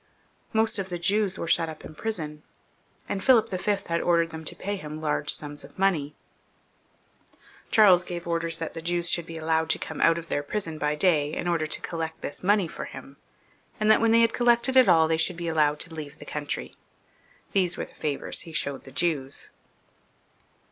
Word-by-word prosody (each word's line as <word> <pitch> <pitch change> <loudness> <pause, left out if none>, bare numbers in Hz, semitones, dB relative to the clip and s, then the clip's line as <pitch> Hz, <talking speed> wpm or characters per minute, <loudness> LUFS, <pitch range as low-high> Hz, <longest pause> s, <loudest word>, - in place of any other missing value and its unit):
Most 220 -1 +1
of 190 -1 -3
the 175 - -3
Jews 195 +2 +1
were - - -4
shut 165 0 +2
up 155 - -9
in - - -9
prison, 155 -7 -4 0.7
and 195 -1 -3
Philip 240 -6 +5
V. 190 +2 0
had 170 0 -1
ordered 170 -1 +2
them 160 0 -7
to - - -2
pay 205 +1 -3
him 155 -4 -7
large 150 -1 0
sums 145 0 -3
of - - -15
money. 165 -7 +1 1.5
Charles 190 -5 +6
gave 175 -1 -6
orders 165 -1 -1
that 165 -1 -5
the 165 - -6
Jews 175 0 +1
should 170 -1 -1
be 165 - -6
allowed 160 0 0
to - - +1
come - - -6
out 165 0 +5
of 165 0 -7
their 145 - -1
prison 160 0 -4
by 150 0 0
day, 150 -3 +2
in - - -3
order 165 -3 0
to 155 - -3
collect 160 -1 -5
this 145 - -5
money 200 -1 +3
for - - -7
him; - - -11 0.6
and 215 0 +4
that 215 - +5
when 230 - +4
they 230 +1 +5
had 230 0 +3
collected 240 +2 +3
it 260 -2 +7
all, 160 -1 +6
they 160 0 +1
should 165 +2 +1
be 170 -1 -4
allowed 150 -2 +2
to 170 - -3
leave 150 -2 -7
the - - -11
country. 145 -1 -4 0.8
These 185 -3 +1
were - - -3
the - - -20
favours 145 -2 -2
he 165 - -8
showed 140 -3 -2
the 135 - -11
Jews. 140 -3 -1
165 Hz, 205 wpm, -26 LUFS, 155-190 Hz, 1.5 s, it